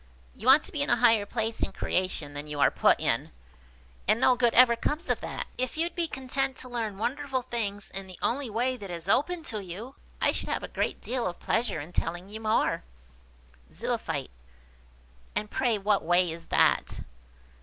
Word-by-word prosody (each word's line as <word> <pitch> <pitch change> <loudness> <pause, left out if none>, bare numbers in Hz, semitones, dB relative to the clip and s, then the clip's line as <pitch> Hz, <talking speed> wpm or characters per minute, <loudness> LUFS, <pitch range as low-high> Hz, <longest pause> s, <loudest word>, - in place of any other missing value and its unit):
You 225 - -7
want 275 +3 +8
to - - -4
be 295 - -2
in 285 - +1
a 240 - +5
higher 225 -4 +4
place 225 0 -1
in - - -1
creation 180 -6 -1
than 145 +1 -6
you 150 -1 -5
are 140 - +5
put - - +4
in, - - 0 0.8
and 215 +3 +4
no 255 0 +5
good 240 -1 +2
ever 240 -1 +7
comes 300 +8 -1
of - - -1
that. - - -4
If 255 +4 -2
you'd 335 +1 0
be 340 -2 -1
content 265 -1 -2
to 255 - -8
learn 225 -5 -3
wonderful 260 +3 -2
things 210 -5 -3
in 195 0 -6
the 185 -2 -11
only 260 +1 -1
way 245 +4 0
that 200 -4 -8
is 170 0 -5
open 330 - +1
to 215 -9 -5
you, 200 +9 -7 0.3
I - - +3
should - - -3
have - - -1
a - - -4
great - - -2
deal 245 -3 -1
of 175 - -5
pleasure 225 -7 0
in 155 +5 -8
telling 175 +3 -2
you 215 +1 -6
more." 220 - +1 0.9
Zoophyte. - - -2 1.0
"And 210 - -2
pray 240 -4 +1
what 205 0 +1
way 175 +1 +3
is 165 0 -8
that?" - - +2
225 Hz, 195 wpm, -28 LUFS, 195-255 Hz, 1.0 s, want